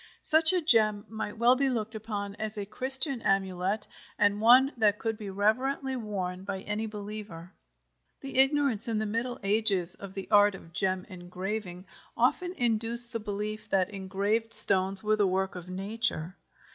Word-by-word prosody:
Such 315 Hz, +1 st, +4 dB
a 365 Hz, -1 st, +1 dB
gem 215 Hz, -8 st, +2 dB
might 220 Hz, -1 st, -6 dB
well 240 Hz, +3 st, +4 dB
be 270 Hz, +1 st, +1 dB
looked 225 Hz, -3 st, -3 dB
upon 205 Hz, -2 st, -5 dB
as 215 Hz, 0 st, -5 dB
a 205 Hz, -, -4 dB
Christian 260 Hz, +4 st, +1 dB
amulet 195 Hz, +1 st, -1 dB, 0.3 s
and 205 Hz, 0 st, +1 dB
one 255 Hz, +5 st, +6 dB
that 210 Hz, -3 st, +2 dB
could 225 Hz, 0 st, -3 dB
be 210 Hz, -2 st, -8 dB
reverently 255 Hz, +7 st, -1 dB
worn 190 Hz, -6 st, -5 dB
by 195 Hz, -1 st, -5 dB
any 210 Hz, +2 st, -4 dB
believer. 205 Hz, -4 st, -9 dB, 0.7 s
The 270 Hz, -1 st, -4 dB
ignorance 270 Hz, -5 st, +2 dB
in 225 Hz, -2 st, -1 dB
the 215 Hz, -, -1 dB
Middle 230 Hz, +4 st, -3 dB
Ages 195 Hz, -4 st, 0 dB
of 195 Hz, -1 st, -11 dB
the 195 Hz, -, -6 dB
art 205 Hz, -1 st, +5 dB
of 165 Hz, -3 st, -14 dB
gem 185 Hz, 0 st, -1 dB
engraving 185 Hz, 0 st, -6 dB, 0.3 s
often 360 Hz, 0 st, +1 dB
induced 235 Hz, +1 st, +4 dB
the 230 Hz, -, -2 dB
belief 210 Hz, 0 st, -5 dB
that 190 Hz, 0 st, +1 dB
engraved 200 Hz, +4 st, -2 dB
stones 190 Hz, 0 st, +5 dB
were 215 Hz, 0 st, +1 dB
the 205 Hz, -2 st, +2 dB
work 190 Hz, +1 st, -1 dB
of 180 Hz, 0 st, -9 dB
nature. 195 Hz, -2 st, -3 dB
210 Hz, 165 wpm, -28 LUFS, 195-230 Hz, 0.7 s, one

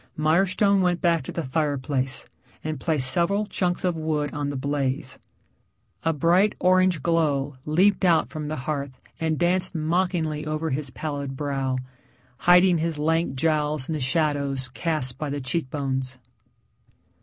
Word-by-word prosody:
Mirestone 190 Hz, +5 st, +3 dB
went 180 Hz, -1 st, +1 dB
back 170 Hz, -2 st, +2 dB
to -, -, -7 dB
the 170 Hz, -1 st, -3 dB
fireplace 135 Hz, -2 st, -1 dB, 0.4 s
and 155 Hz, -2 st, -3 dB
placed 145 Hz, -2 st, 0 dB
several 175 Hz, +9 st, +1 dB
chunks 180 Hz, -3 st, -1 dB
of 180 Hz, -2 st, +1 dB
wood 155 Hz, -2 st, -1 dB
on 145 Hz, -1 st, -2 dB
the 145 Hz, -, -4 dB
blaze. 135 Hz, 0 st, -2 dB, 0.8 s
A 165 Hz, -, +1 dB
bright 170 Hz, +7 st, +3 dB
orange 185 Hz, -4 st, +3 dB
glow 145 Hz, -5 st, +1 dB
leaped 185 Hz, +7 st, +3 dB
out 170 Hz, -3 st, +4 dB
from 155 Hz, -2 st, -6 dB
the 155 Hz, -, -3 dB
hearth 140 Hz, -3 st, -3 dB, 0.2 s
and 160 Hz, -1 st, 0 dB
danced 180 Hz, +2 st, +1 dB
mockingly 160 Hz, -1 st, 0 dB
over 155 Hz, +1 st, -2 dB
his 140 Hz, +1 st, -2 dB
pallid 140 Hz, -1 st, -5 dB
brow, 135 Hz, -2 st, -1 dB, 0.7 s
hiding 180 Hz, -1 st, +6 dB
his 165 Hz, -1 st, -1 dB
lank 160 Hz, -1 st, 0 dB
jowls 150 Hz, -1 st, 0 dB
in 160 Hz, -, -2 dB
the 155 Hz, -, -2 dB
shadows 140 Hz, -2 st, 0 dB
cast 130 Hz, -3 st, -2 dB
by 150 Hz, -, -3 dB
the 145 Hz, +1 st, -3 dB
cheekbones. 130 Hz, -2 st, -2 dB
155 Hz, 145 wpm, -25 LUFS, 140-170 Hz, 0.8 s, hiding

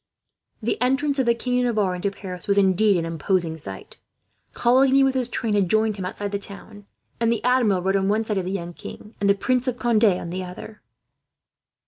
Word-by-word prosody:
The 230 Hz, +1 st, -1 dB
entrance 275 Hz, +3 st, +1 dB
of 260 Hz, -, +1 dB
the 235 Hz, -, +4 dB
King 250 Hz, +1 st, -1 dB
of 250 Hz, -, +1 dB
Navarre 210 Hz, -6 st, +1 dB
into 180 Hz, +3 st, -2 dB
Paris 185 Hz, -3 st, -8 dB
was, 200 Hz, 0 st, +2 dB
indeed, 200 Hz, +1 st, +4 dB
an 165 Hz, -, -2 dB
imposing 165 Hz, 0 st, -1 dB
sight. 95 Hz, -12 st, -10 dB, 0.5 s
Coligny 265 Hz, +3 st, +4 dB
with 270 Hz, -1 st, +2 dB
his 255 Hz, -2 st, 0 dB
train 230 Hz, -3 st, -2 dB
had 200 Hz, -4 st, +2 dB
joined 215 Hz, 0 st, +1 dB
him 190 Hz, -, -4 dB
outside 200 Hz, +2 st, -4 dB
the 200 Hz, -, -2 dB
town, 205 Hz, +1 st, -9 dB, 0.3 s
and 230 Hz, 0 st, +2 dB
the 230 Hz, -, -1 dB
Admiral 235 Hz, -7 st, +2 dB
rode 195 Hz, +1 st, +1 dB
on 195 Hz, 0 st, +1 dB
one 215 Hz, +2 st, +1 dB
side 210 Hz, -3 st, -1 dB
of 185 Hz, -, -4 dB
the 185 Hz, -, -3 dB
young 175 Hz, -3 st, -4 dB
king, 210 Hz, +5 st, -11 dB
and 200 Hz, -, +2 dB
the 200 Hz, -, +5 dB
Prince 255 Hz, +5 st, 0 dB
of 250 Hz, -1 st, -1 dB
Conde 235 Hz, -3 st, +1 dB
on 180 Hz, -4 st, +1 dB
the 185 Hz, +1 st, -4 dB
other. 185 Hz, +4 st, -10 dB
205 Hz, 215 wpm, -23 LUFS, 185-240 Hz, 0.5 s, the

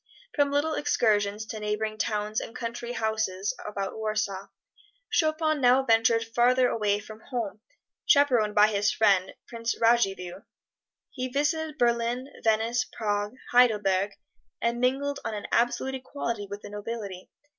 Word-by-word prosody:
From 285 Hz, -5 st, +2 dB
little 295 Hz, +3 st, +1 dB
excursions 215 Hz, -8 st, +1 dB
to 220 Hz, 0 st, -6 dB
neighboring 215 Hz, +1 st, -2 dB
towns 210 Hz, 0 st, -1 dB
and 230 Hz, -, -8 dB
country 235 Hz, 0 st, -5 dB
houses 220 Hz, -3 st, -1 dB
about 200 Hz, -2 st, -4 dB
Warsaw, 215 Hz, -3 st, -2 dB, 0.6 s
Chopin 310 Hz, -2 st, +1 dB
now 255 Hz, +1 st, +5 dB
ventured 230 Hz, -1 st, +3 dB
farther 245 Hz, +2 st, +3 dB
away 210 Hz, -2 st, +1 dB
from 215 Hz, +1 st, -10 dB
home, 225 Hz, -4 st, -5 dB, 0.5 s
chaperoned 245 Hz, -8 st, +4 dB
by 210 Hz, +1 st, +6 dB
his 205 Hz, -1 st, +1 dB
friend, 195 Hz, -4 st, +2 dB
Prince 230 Hz, -1 st, -3 dB
Radziwill. 195 Hz, -6 st, +1 dB, 0.7 s
He 255 Hz, -1 st, -3 dB
visited 300 Hz, +3 st, -1 dB
Berlin, 240 Hz, +1 st, 0 dB
Venice, 225 Hz, +2 st, +2 dB
Prague, 205 Hz, +1 st, -2 dB, 0.2 s
Heidelberg, 205 Hz, -5 st, +3 dB, 0.5 s
and 235 Hz, +1 st, -1 dB
mingled 275 Hz, +3 st, 0 dB
on 220 Hz, -, -3 dB
an 205 Hz, -, -6 dB
absolute 245 Hz, +3 st, +1 dB
equality 235 Hz, -5 st, -4 dB
with 205 Hz, +1 st, -7 dB
the -, -, -9 dB
nobility. 205 Hz, -3 st, -6 dB
225 Hz, 135 wpm, -27 LUFS, 210-250 Hz, 0.7 s, by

